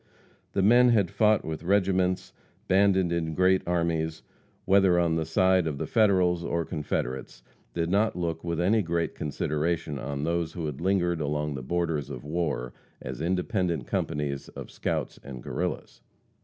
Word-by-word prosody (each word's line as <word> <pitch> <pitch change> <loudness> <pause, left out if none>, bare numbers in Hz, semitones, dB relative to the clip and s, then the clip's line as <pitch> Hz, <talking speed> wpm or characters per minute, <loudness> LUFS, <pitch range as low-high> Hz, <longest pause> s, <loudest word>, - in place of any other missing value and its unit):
The 95 - +1
men 120 +4 +6
who 120 - +4
had 95 -5 +1
fought 110 -1 +3
with 80 -1 -4
regiments, 95 0 +1 0.3
banded 95 -2 +3
in 80 -2 -1
great 95 +2 +4
armies, 80 -2 -1 0.4
whether 95 -2 +4
on 85 -2 +2
the 80 -1 -1
side 95 +2 +3
of 75 -3 -3
the - - -3
Federals 90 -6 +3
or 85 -1 -1
Confederates, 65 -5 -4 0.3
did 85 0 -1
not 105 +3 +2
look 85 -2 -3
with 85 -1 -2
any 105 +5 +3
great 85 -2 -1
consideration 75 0 -2
on 70 +2 -4
those 85 0 -1
who 85 -3 -4
had 75 -1 -5
lingered 90 -3 +1
along 75 0 -1
the 65 - -5
borders 80 0 -1
of 60 - -7
war, 75 -6 -2 0.3
as 65 +3 -6
independent 90 - -1
companies 70 0 -2
of - - -9
scouts - - -3
and 65 -3 -8
Guerrillas. - - -4
85 Hz, 160 wpm, -27 LUFS, 75-95 Hz, 0.4 s, men